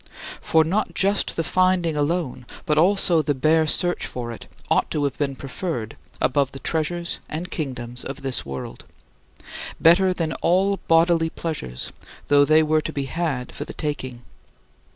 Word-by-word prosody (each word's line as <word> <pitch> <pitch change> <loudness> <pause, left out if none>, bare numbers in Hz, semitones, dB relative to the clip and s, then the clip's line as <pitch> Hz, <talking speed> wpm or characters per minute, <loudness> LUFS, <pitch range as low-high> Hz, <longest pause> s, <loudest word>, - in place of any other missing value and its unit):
For 160 0 +4
not 190 +7 -1
just 200 +1 +1
the 165 - 0
finding 185 -2 +2
alone, 145 -4 -1 0.2
but 150 0 +2
also 180 -2 +4
the 145 -1 0
bare 155 +4 +3
search 175 +3 +1
for 120 -1 -5
it, 115 - -9 0.2
ought - - +2
to 150 - -1
have 140 -2 0
been 140 -2 -1
preferred 135 - -4 0.2
above 140 0 +1
the - - -6
treasures 170 +3 -2
and 170 +4 -5
kingdoms 125 -5 -5
of 135 0 -7
this 135 -2 -2
world; 70 -1 -7 1.0
better 180 +3 +5
than 165 -3 -2
all 195 +3 +2
bodily 165 0 +4
pleasures, 145 - -4 0.4
though 145 0 +6
they 155 +1 +5
were 155 0 +2
to - - -4
be 140 -1 -3
had 140 -4 -2
for - - -6
the - - -8
taking. 130 -5 -4
155 Hz, 160 wpm, -23 LUFS, 135-170 Hz, 1.0 s, though